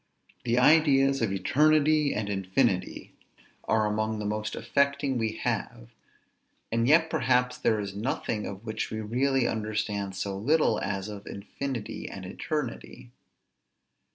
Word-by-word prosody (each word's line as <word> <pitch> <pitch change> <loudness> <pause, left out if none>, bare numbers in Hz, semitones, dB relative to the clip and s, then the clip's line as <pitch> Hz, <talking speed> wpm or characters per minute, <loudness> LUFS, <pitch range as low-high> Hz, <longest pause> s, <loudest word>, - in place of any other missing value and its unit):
The 120 0 +1
ideas 135 -1 +4
of 110 -4 +1
eternity, 150 +8 +3
and 105 -1 -2
infinity, 95 +1 -1 0.5
are 110 -1 +2
among 110 +1 -1
the 105 - -4
most 105 0 -2
affecting 140 +2 0
we 110 -1 -1
have: - - -3 0.8
and 115 +1 +1
yet 160 +3 +5
perhaps 125 -3 +1
there 110 -3 +2
is 100 -1 -5
nothing 105 -1 -2
of 100 +3 -8
which 110 -1 -3
we 110 - -4
really 125 +4 +1
understand 105 -3 -2
so 100 +1 -3
little, 145 +11 +2
as 100 0 -3
of 105 -1 -8
infinity 115 +3 -5
and 95 -1 -8
eternity. 125 +3 -5
110 Hz, 130 wpm, -28 LUFS, 105-135 Hz, 0.8 s, yet